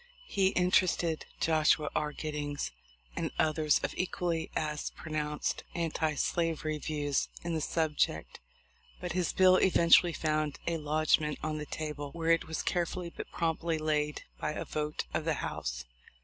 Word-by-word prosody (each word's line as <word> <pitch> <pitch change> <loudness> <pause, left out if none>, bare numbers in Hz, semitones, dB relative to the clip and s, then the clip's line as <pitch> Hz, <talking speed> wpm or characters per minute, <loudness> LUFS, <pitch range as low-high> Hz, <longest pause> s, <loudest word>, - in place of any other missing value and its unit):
He 195 - +2
inter 180 +1 +4
ested 165 -2 -1
Joshua 155 -1 +3
R. 150 0 0
Giddings 145 -1 -3 0.4
and - - -1
others 155 -1 +3
of - - -1
equally 175 -2 -1
as 150 -1 -1
pronounced 150 -1 -2
anti 160 -2 0
slavery 155 0 0
views 145 -2 -1
in 170 0 -2
the 160 - 0
subject, 150 - 0 0.6
but 180 -1 -4
his 180 -2 0
bill 185 0 +6
eventually 175 -1 +6
found 155 -2 0
a 170 -1 0
lodgment 150 0 +2
on 155 0 -2
"the 150 - -5
table/' 150 -1 -5
where 165 0 +1
it 165 - +3
was 160 - -3
carefully 175 0 -1
but - - -7
promptly 165 0 0
laid 150 -1 0 0.2
by 150 - -1
a - - -4
vote 150 0 -2
of - - 0
the - - +1
House. - - -4
155 Hz, 150 wpm, -31 LUFS, 150-170 Hz, 0.6 s, bill